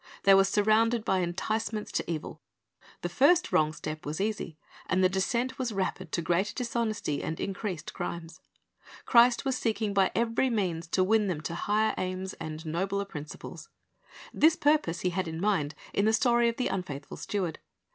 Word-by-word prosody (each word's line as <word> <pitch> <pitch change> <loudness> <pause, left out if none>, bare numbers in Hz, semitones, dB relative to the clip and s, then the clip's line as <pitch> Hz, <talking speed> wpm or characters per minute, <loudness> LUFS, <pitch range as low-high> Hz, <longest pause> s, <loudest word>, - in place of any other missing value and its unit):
They 195 - +7
were 195 0 +7
surrounded 215 +3 +2
by 190 - +2
enticements 210 +5 -2
to - - -2
evil. 155 -2 -5 0.6
The - - 0
first 285 - +3
wrong 155 -1 +3
step 155 0 -6
was 150 +3 -4
easy, 200 -6 -2 0.3
and 185 +1 +2
the 185 - +5
descent 235 +8 -1
was 250 -3 -1
rapid 190 -3 -3
to 170 - 0
greater 180 +5 0
dishonesty 230 - -2
and 160 - -4
increased 190 -3 -4
crimes, 170 0 -6 0.6
Christ 240 +1 +5
was 265 -2 0
seeking 220 -2 -1
by 195 -2 +4
every 235 +3 +1
means 180 -8 -1
to 185 +3 +2
win 210 +2 +3
them 170 -5 -2
to 165 - -4
higher 210 +5 +1
aims 185 +1 -3
and 155 0 -6
nobler 190 +5 -1
principles. 150 -5 -9 0.6
This 315 +1 +5
purpose 290 - +2
He 180 - 0
had 185 0 -2
in 160 0 -5
mind 170 -7 0 0.2
in 200 - +2
the 220 - +3
story 235 +1 +3
of 230 - -4
the 255 - 0
unfaithful 150 -7 -5
steward. 185 -6 -3
195 Hz, 175 wpm, -29 LUFS, 170-225 Hz, 0.6 s, They